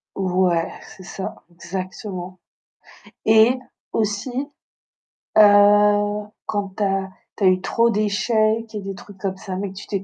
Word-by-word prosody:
Ouais, 180 Hz, -3 st, +1 dB, 0.2 s
c'est 185 Hz, -, -13 dB
ça, 190 Hz, +2 st, -6 dB, 0.2 s
exactement. 185 Hz, +1 st, -6 dB, 0.9 s
Et 220 Hz, +4 st, +5 dB, 0.3 s
aussi, 215 Hz, +3 st, -1 dB, 1.1 s
heu, -, -, +9 dB, 1.0 s
quand 205 Hz, -2 st, -2 dB
tu 210 Hz, -, 0 dB
as 195 Hz, -1 st, 0 dB, 0.3 s
tu 205 Hz, -, -3 dB
as -, -, +6 dB
eu 185 Hz, 0 st, +4 dB
trop 230 Hz, +4 st, +2 dB
d'échecs 215 Hz, +1 st, +1 dB
et -, -, -2 dB
des 195 Hz, 0 st, -6 dB
trucs 200 Hz, 0 st, -13 dB
comme 190 Hz, 0 st, -3 dB
ça, 190 Hz, -2 st, -6 dB
mais 200 Hz, +1 st, -3 dB
que -, -, -14 dB
tu 195 Hz, -, -9 dB
t'es 195 Hz, -2 st, -3 dB
195 Hz, 145 wpm, -22 LUFS, 185-215 Hz, 1.1 s, heu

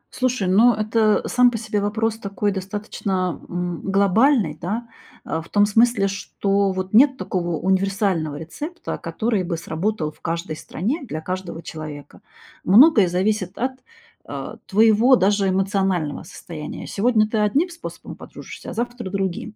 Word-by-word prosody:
Слушай, 255 Hz, -7 st, 0 dB
ну, 225 Hz, +6 st, +5 dB
это 215 Hz, 0 st, +2 dB
сам 250 Hz, 0 st, +4 dB
по 230 Hz, -, -3 dB
себе 215 Hz, -2 st, -2 dB
вопрос 220 Hz, +2 st, -1 dB
такой 200 Hz, 0 st, -2 dB
достаточно, 190 Hz, -2 st, -3 dB
м, 175 Hz, -1 st, -3 dB
глобальный, 200 Hz, -, +3 dB
да. 220 Hz, +7 st, -3 dB, 0.4 s
А, 160 Hz, -, -2 dB
в -, -, -15 dB
том 205 Hz, 0 st, +4 dB
смысле, 220 Hz, -1 st, +3 dB
что, 195 Hz, 0 st, 0 dB
вот, 185 Hz, +1 st, -4 dB
нет 265 Hz, +3 st, +6 dB
такого 175 Hz, -7 st, -2 dB
универсального 190 Hz, -4 st, 0 dB
рецепта, 290 Hz, -, -6 dB
который 220 Hz, -4 st, -1 dB
бы 170 Hz, -2 st, -3 dB
сработал 165 Hz, 0 st, -2 dB
в -, -, -27 dB
каждой 165 Hz, -1 st, -3 dB
стране 235 Hz, -, -3 dB
для 155 Hz, -, -5 dB
каждого 180 Hz, -1 st, -5 dB
человека. 155 Hz, -2 st, -9 dB, 0.4 s
Многое 215 Hz, -, +6 dB
зависит 185 Hz, +1 st, -1 dB
от, 255 Hz, +2 st, 0 dB, 0.6 s
э, -, -, -6 dB
твоего 225 Hz, +5 st, +5 dB
даже 200 Hz, -1 st, +2 dB
эмоционального 190 Hz, -5 st, 0 dB
состояния. 155 Hz, -3 st, -8 dB
Сегодня 215 Hz, 0 st, +2 dB
ты 215 Hz, 0 st, -1 dB
одним 275 Hz, -, +2 dB
способом 340 Hz, -1 st, -9 dB
подружишься, -, -, -10 dB
а -, -, -6 dB
завтра 240 Hz, -3 st, -4 dB
другим. 195 Hz, +2 st, -3 dB
200 Hz, 145 wpm, -22 LUFS, 180-225 Hz, 0.6 s, нет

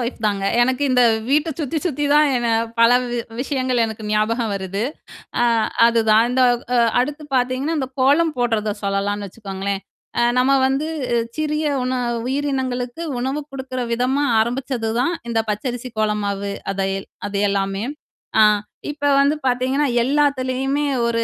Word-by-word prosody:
வைஃப்தாங்க. 215 Hz, -5 st, -1 dB, 0.2 s
எனக்கு 260 Hz, +3 st, +1 dB
இந்த 250 Hz, -1 st, +4 dB, 0.3 s
வீட்டைச் 300 Hz, +2 st, +1 dB
சுத்தி 310 Hz, +2 st, -1 dB
சுத்தி 295 Hz, -4 st, -1 dB
தான் 300 Hz, 0 st, +5 dB
என்ன 240 Hz, -1 st, 0 dB, 0.3 s
பல 230 Hz, +1 st, +7 dB, 0.2 s
வி 240 Hz, -, -2 dB, 0.2 s
விஷயங்கள் 255 Hz, -3 st, 0 dB
எனக்கு 220 Hz, -1 st, -7 dB
ஞாபகம் 215 Hz, +1 st, 0 dB
வருது. 195 Hz, +1 st, -3 dB, 0.6 s
அ -, -, +4 dB, 0.4 s
அதுதான். 225 Hz, -1 st, +4 dB
இந்த 260 Hz, +1 st, +2 dB, 0.3 s
அ -, -, +4 dB, 0.2 s
அடுத்து 295 Hz, +4 st, -4 dB
பாத்தீங்கன்னா, 255 Hz, +5 st, 0 dB
அந்தக் 260 Hz, -2 st, -4 dB
கோலம் 300 Hz, +5 st, +3 dB
போடுறத 225 Hz, -3 st, 0 dB
சொல்லலாம்னு 200 Hz, +1 st, -1 dB
வச்சுக்கோங்களேன். 195 Hz, -1 st, -4 dB, 0.4 s
அ -, -, +3 dB, 0.2 s
நம்ம 255 Hz, +2 st, +3 dB, 0.2 s
வந்து 270 Hz, +4 st, -1 dB, 0.5 s
சிறிய 305 Hz, 0 st, -1 dB, 0.2 s
உண 255 Hz, +1 st, -1 dB, 0.3 s
உயிரினங்களுக்கு 260 Hz, -1 st, -2 dB, 0.2 s
உணவு 265 Hz, +4 st, -2 dB
குடுக்கிற 260 Hz, -1 st, -5 dB
விதமா 255 Hz, +4 st, +1 dB, 0.2 s
ஆரம்பிச்சதுதான், 245 Hz, +3 st, -1 dB, 0.2 s
இந்தப் 225 Hz, -1 st, -1 dB
பச்சரிசி 245 Hz, +3 st, -4 dB
கோலம் 210 Hz, -1 st, 0 dB
மாவு. 200 Hz, 0 st, -2 dB, 0.2 s
அது 195 Hz, 0 st, -1 dB
எல் -, -, -13 dB, 0.2 s
அது 200 Hz, -, -3 dB
எல்லாமே. 195 Hz, 0 st, -1 dB, 0.6 s
அ. -, -, +8 dB, 0.5 s
இப்போ 290 Hz, -1 st, -2 dB
வந்து 285 Hz, +2 st, +3 dB
பாத்தீங்கன்னா, 260 Hz, +3 st, +1 dB, 0.2 s
எல்லாத்துலயும் 270 Hz, -1 st, +1 dB, 0.3 s
ஒரு 230 Hz, 0 st, 0 dB
250 Hz, 140 wpm, -21 LUFS, 215-275 Hz, 0.6 s, அ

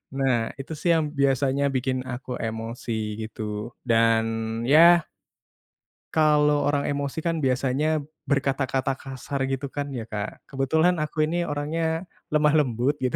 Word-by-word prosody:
Nah 125 Hz, -4 st, +1 dB
itu 135 Hz, +3 st, -9 dB
sih 170 Hz, -2 st, +3 dB
yang 155 Hz, -2 st, 0 dB
biasanya 140 Hz, 0 st, +2 dB
bikin 130 Hz, -1 st, -1 dB
aku 125 Hz, 0 st, -5 dB
emosi 110 Hz, -1 st, -4 dB
gitu. 110 Hz, +1 st, -5 dB
Dan 115 Hz, -2 st, +3 dB, 0.4 s
ya 165 Hz, +5 st, +6 dB, 1.1 s
kalau 150 Hz, -2 st, +4 dB
orang 145 Hz, -1 st, +1 dB
emosi 140 Hz, +1 st, -2 dB
kan 165 Hz, -2 st, 0 dB
biasanya 135 Hz, +4 st, +1 dB, 0.3 s
berkata-kata 135 Hz, -1 st, 0 dB
kasar 135 Hz, 0 st, -4 dB
gitu 135 Hz, +1 st, -3 dB
kan 145 Hz, 0 st, -3 dB
ya, 115 Hz, -3 st, -4 dB
Kak. 105 Hz, -1 st, -5 dB
Kebetulan 160 Hz, +6 st, +2 dB
aku 155 Hz, 0 st, 0 dB
ini 170 Hz, +2 st, -1 dB
orangnya 160 Hz, +3 st, -2 dB, 0.3 s
lemah 150 Hz, 0 st, +4 dB
lembut 130 Hz, +2 st, 0 dB
gitu. 125 Hz, -1 st, 0 dB
135 Hz, 130 wpm, -25 LUFS, 125-150 Hz, 1.1 s, ya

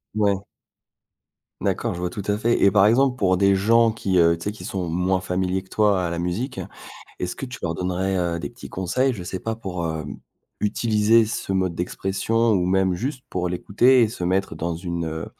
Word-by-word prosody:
Ouais. 100 Hz, -2 st, +2 dB, 1.2 s
D'accord, -, -, -1 dB
je 85 Hz, -, -6 dB
vois 90 Hz, 0 st, -2 dB
tout 100 Hz, -, -6 dB
à 105 Hz, 0 st, 0 dB
fait, 120 Hz, +2 st, +2 dB
et 100 Hz, -, +5 dB
par 100 Hz, 0 st, +5 dB
exemple, 125 Hz, +3 st, +3 dB
pour 95 Hz, -5 st, +2 dB
des 100 Hz, +1 st, +4 dB
gens 115 Hz, +4 st, +4 dB
qui, 100 Hz, -4 st, -1 dB
heu, 85 Hz, -1 st, +5 dB
tu 85 Hz, -, -10 dB
sais, 105 Hz, -, 0 dB
qui 110 Hz, -, -10 dB
sont 90 Hz, -3 st, -3 dB
moins 90 Hz, +2 st, 0 dB
familiers 95 Hz, +1 st, -1 dB
que 95 Hz, -, -23 dB
toi 105 Hz, -4 st, +2 dB
à -, -, -3 dB
la 85 Hz, -, -3 dB
musique, 100 Hz, +11 st, -3 dB, 0.6 s
est-ce 90 Hz, -, -3 dB
que 135 Hz, -, -6 dB
tu 125 Hz, +1 st, -8 dB
leur 90 Hz, -, -1 dB
donnerais, 90 Hz, +2 st, -1 dB
heu, 85 Hz, -1 st, -1 dB
des 85 Hz, -, -5 dB
petits 120 Hz, -, -11 dB
conseils? 125 Hz, +9 st, 0 dB
Je 95 Hz, -, -7 dB
sais 90 Hz, +1 st, -5 dB
pas, 115 Hz, 0 st, -3 dB
pour, 95 Hz, -6 st, -5 dB
heu, 80 Hz, -1 st, -3 dB, 0.6 s
utiliser 110 Hz, +1 st, +3 dB
ce 110 Hz, -2 st, -4 dB
mode 95 Hz, -2 st, 0 dB
d'expression 95 Hz, +6 st, 0 dB
ou 90 Hz, -3 st, +2 dB
même 95 Hz, 0 st, +2 dB
juste 130 Hz, +7 st, -4 dB
pour 90 Hz, -1 st, -1 dB
l'écouter 120 Hz, +8 st, +3 dB
et 115 Hz, -, +3 dB
se 105 Hz, -, -8 dB
mettre 95 Hz, 0 st, 0 dB
dans 85 Hz, +1 st, -3 dB
une, 85 Hz, -1 st, -4 dB
heu, 80 Hz, +1 st, -4 dB
95 Hz, 215 wpm, -23 LUFS, 90-110 Hz, 1.2 s, et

